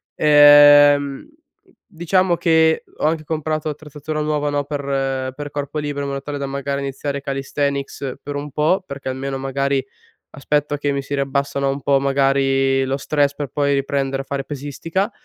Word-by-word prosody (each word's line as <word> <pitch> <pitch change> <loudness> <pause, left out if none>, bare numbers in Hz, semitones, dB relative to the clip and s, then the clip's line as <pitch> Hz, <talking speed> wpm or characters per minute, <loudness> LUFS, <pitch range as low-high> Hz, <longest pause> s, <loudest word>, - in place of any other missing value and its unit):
Ehm, 145 -1 +6 0.6
diciamo 180 0 +1
che 160 -1 +3
ho - - -2
anche 155 0 0
comprato 155 0 -2
l'attrezzatura 150 +1 -6
nuova, 150 -1 -1
no, 145 -1 -1
per 135 -2 -2
per 145 0 -6
corpo 145 +1 -4
libero 145 -1 -3
in 140 - -3
modo 140 0 -4
tale 145 0 -5
da 140 - -3
magari 140 0 -3
iniziare 140 +1 -4
calisthenics 140 0 -3
per 145 0 -6
un 145 +1 -5
po', 160 +7 +1
perché 140 -3 -6
almeno 135 +1 -4
magari 135 0 -1 0.5
aspetto 145 +2 -1
che 145 -1 -1
mi 140 0 -2
si 140 - -5
riabbassano 140 0 -1
un 135 +1 -3
po', 140 +1 +3
magari, 135 -1 +2
lo 135 +1 -1
stress 145 0 0
per 145 -2 -5
poi 140 +1 0
riprendere 135 0 -1
a - - -16
fare 135 0 -4
pesistica, 150 - -3
140 Hz, 165 wpm, -20 LUFS, 135-150 Hz, 0.6 s, Ehm